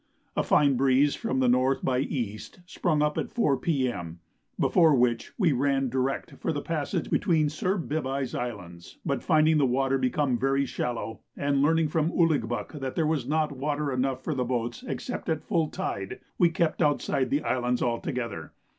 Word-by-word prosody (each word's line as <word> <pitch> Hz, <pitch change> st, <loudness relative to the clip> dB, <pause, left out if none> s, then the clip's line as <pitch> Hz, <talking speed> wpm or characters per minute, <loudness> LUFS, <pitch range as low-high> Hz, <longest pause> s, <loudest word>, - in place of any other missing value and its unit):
A -, -, +2 dB
fine 140 Hz, -3 st, +3 dB
breeze 135 Hz, +2 st, +3 dB
from 130 Hz, 0 st, -1 dB
N. 130 Hz, +2 st, +3 dB
by 130 Hz, -1 st, +1 dB
E. 120 Hz, -6 st, -2 dB, 0.3 s
sprung 160 Hz, -4 st, 0 dB
up 150 Hz, 0 st, 0 dB
at -, -, -3 dB
4 150 Hz, -12 st, +2 dB
P.M., 120 Hz, -, -2 dB, 0.4 s
before 160 Hz, -4 st, +4 dB
which 120 Hz, -2 st, +1 dB
we 185 Hz, -7 st, +3 dB
ran 135 Hz, 0 st, +1 dB
direct 130 Hz, +2 st, -2 dB
for -, -, -1 dB
the 145 Hz, -, -2 dB
passage 165 Hz, +2 st, -2 dB
between 160 Hz, -6 st, +2 dB
Sir 185 Hz, +6 st, -1 dB
Bibye's 140 Hz, -5 st, -2 dB
Islands; 90 Hz, -8 st, -6 dB
but -, -, -1 dB
finding 155 Hz, 0 st, +4 dB
the 140 Hz, -, +3 dB
water 135 Hz, +2 st, +1 dB
become 130 Hz, -1 st, +1 dB
very 135 Hz, +2 st, +1 dB
shallow, 120 Hz, -3 st, -4 dB, 0.2 s
and 140 Hz, -1 st, +1 dB
learning 160 Hz, +1 st, +3 dB
from 160 Hz, +1 st, +1 dB
Ouligbuck 150 Hz, -4 st, 0 dB
that 135 Hz, -1 st, -4 dB
there 165 Hz, -, +1 dB
was 150 Hz, -5 st, 0 dB
not 155 Hz, +1 st, +1 dB
water 145 Hz, +1 st, -2 dB
enough 130 Hz, 0 st, -1 dB
for 155 Hz, -, -1 dB
boats 125 Hz, -, -2 dB
except 250 Hz, -, -4 dB
at 160 Hz, -1 st, -1 dB
full 165 Hz, -5 st, +1 dB
tide, 100 Hz, -, -4 dB, 0.2 s
we 175 Hz, -, +5 dB
kept 165 Hz, -2 st, 0 dB
outside 145 Hz, -3 st, +1 dB
the 145 Hz, -, 0 dB
islands 125 Hz, -1 st, 0 dB
altogether. 115 Hz, -, -3 dB
135 Hz, 170 wpm, -27 LUFS, 125-155 Hz, 0.4 s, we